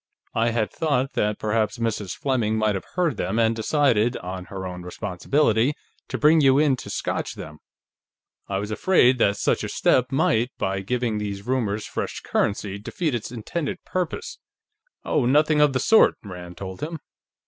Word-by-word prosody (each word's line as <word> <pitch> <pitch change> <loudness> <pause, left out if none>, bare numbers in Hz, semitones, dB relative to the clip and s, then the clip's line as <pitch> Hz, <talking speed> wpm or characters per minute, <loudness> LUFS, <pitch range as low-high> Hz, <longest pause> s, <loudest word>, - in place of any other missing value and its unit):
I 115 +1 +2
had 115 -2 -1
thought 140 -4 0
that 105 0 0
perhaps 110 +2 0
Mrs. 110 -4 -2
Fleming 120 -6 0
might 110 -1 +2
have 95 - -4
heard 170 - +1
them, 95 +5 -2
and 115 0 +3
decided, 120 -2 +2
on 90 0 -6
her 95 -1 -7
own 90 -1 -6
responsibility, 110 +8 0 0.3
to - - -3
bring 155 +2 +5
you 135 -1 +5
in 145 -2 +4
to - - -8
scotch - - -3
them; 75 0 -9 0.9
I 95 - -1
was 105 +2 -4
afraid 125 - +4
that 100 -2 +3
such - - +1
a - - -3
step 125 +1 +2
might, 120 -3 +2
by 95 0 -1
giving 115 +2 -1
these 100 -1 -5
rumors 110 -5 -1
fresh - - -4
currency, 100 -1 -1
defeat 155 - -2
its 120 -1 -3
intended 140 +7 -4
purpose." 180 -3 -3 0.7
"Oh, 120 - +1
nothing 150 +3 +4
of 150 -1 +5
the 130 - 0
sort!" 220 - +5
Rand 90 -3 -9
told 95 -1 -7
him. 160 +2 -4
115 Hz, 170 wpm, -24 LUFS, 100-135 Hz, 0.9 s, bring